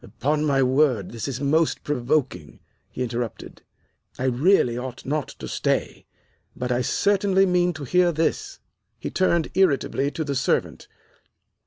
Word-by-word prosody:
"Upon 145 Hz, +9 st, -1 dB
my 135 Hz, -2 st, +2 dB
word, 130 Hz, -7 st, +2 dB
this 115 Hz, +2 st, -5 dB
is 135 Hz, -2 st, -4 dB
most 155 Hz, +3 st, +1 dB
provoking," 130 Hz, -, -2 dB, 0.3 s
he 125 Hz, -, -4 dB
interrupted. 120 Hz, -1 st, -5 dB, 0.6 s
"I -, -, -4 dB
really 130 Hz, 0 st, +3 dB
ought 125 Hz, 0 st, -6 dB
not 150 Hz, +1 st, -1 dB
to -, -, -7 dB
stay. -, -, -2 dB, 0.5 s
But 125 Hz, 0 st, -3 dB
I 125 Hz, 0 st, +1 dB
certainly 195 Hz, -, +2 dB
mean 180 Hz, -1 st, +2 dB
to 155 Hz, -3 st, -8 dB
hear 180 Hz, +5 st, +3 dB
this." 280 Hz, -, -2 dB, 0.4 s
He -, -, -6 dB
turned 170 Hz, -3 st, +1 dB
irritably 140 Hz, -6 st, +1 dB
to 160 Hz, -, -4 dB
the 145 Hz, -2 st, -3 dB
servant. 130 Hz, -, -1 dB
140 Hz, 145 wpm, -24 LUFS, 125-170 Hz, 0.6 s, really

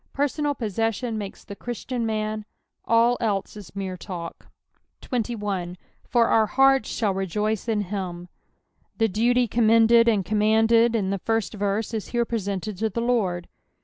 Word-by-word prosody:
Personal 290 Hz, +1 st, 0 dB
possession 225 Hz, +1 st, -2 dB
makes 205 Hz, -2 st, -6 dB
the 200 Hz, -, -9 dB
Christian 240 Hz, +1 st, -4 dB
man; 215 Hz, 0 st, -2 dB, 0.4 s
all 235 Hz, +1 st, +3 dB
else 205 Hz, -4 st, -1 dB
is 205 Hz, -2 st, -11 dB
mere 190 Hz, -2 st, -4 dB
tal^ 175 Hz, -2 st, -6 dB, 0.7 s
21. 205 Hz, -7 st, -3 dB, 0.2 s
" -, -, -34 dB
JW 245 Hz, -, 0 dB
our 220 Hz, -1 st, +3 dB
heartt 270 Hz, -1 st, +4 dB
thall 210 Hz, -4 st, 0 dB
rejotee 210 Hz, +4 st, -2 dB
in 215 Hz, -2 st, +1 dB
him," 180 Hz, -3 st, -5 dB, 0.7 s
The 225 Hz, -, +3 dB
duty 240 Hz, +4 st, +2 dB
commended 230 Hz, +1 st, +5 dB
snd 210 Hz, -5 st, +2 dB
com 210 Hz, +3 st, 0 dB
manded 225 Hz, +2 st, +4 dB
in 195 Hz, -4 st, 0 dB
the 195 Hz, -, -1 dB
first 225 Hz, +2 st, -1 dB
verse 205 Hz, +2 st, -2 dB
is 220 Hz, -2 st, -3 dB
here 240 Hz, -1 st, 0 dB
presented 200 Hz, -3 st, -3 dB
to 220 Hz, 0 st, +1 dB
the 215 Hz, -, -4 dB
Lord. 210 Hz, -8 st, 0 dB
220 Hz, 155 wpm, -24 LUFS, 200-235 Hz, 0.7 s, commended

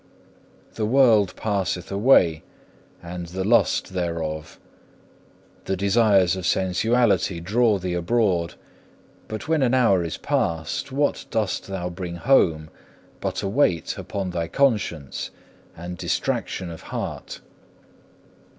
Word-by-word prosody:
The 110 Hz, -, -2 dB
world 115 Hz, -6 st, +4 dB
passeth 95 Hz, -5 st, -2 dB
away 100 Hz, -7 st, +4 dB, 0.6 s
and 85 Hz, 0 st, -6 dB
the 95 Hz, +2 st, -4 dB
lust 110 Hz, -2 st, +2 dB
thereof. 85 Hz, -3 st, -4 dB, 1.1 s
The 95 Hz, -, -1 dB
desires 100 Hz, -2 st, +3 dB
of 95 Hz, -2 st, -3 dB
sensuality 95 Hz, 0 st, +1 dB
draw 105 Hz, +5 st, +2 dB
thee 90 Hz, -1 st, -3 dB
abroad, 90 Hz, -2 st, 0 dB, 0.7 s
but 110 Hz, -2 st, -6 dB
when 160 Hz, -2 st, +2 dB
an 130 Hz, -1 st, +3 dB
hour 105 Hz, -8 st, +3 dB
is 85 Hz, -, -4 dB
past, 80 Hz, -, -2 dB
what 145 Hz, +2 st, 0 dB
dost 110 Hz, -5 st, -1 dB
thou 90 Hz, -2 st, -4 dB
bring 85 Hz, -1 st, -6 dB
home, 85 Hz, -, +2 dB, 0.5 s
but -, -, -3 dB
a -, -, -1 dB
weight 95 Hz, -, +1 dB
upon 95 Hz, -2 st, -4 dB
thy 85 Hz, -1 st, -2 dB
conscience 105 Hz, -, 0 dB, 0.5 s
and 90 Hz, +1 st, -7 dB
distraction 90 Hz, -3 st, -2 dB
of 80 Hz, -, -9 dB
heart? -, -, -5 dB
95 Hz, 115 wpm, -23 LUFS, 85-110 Hz, 1.1 s, world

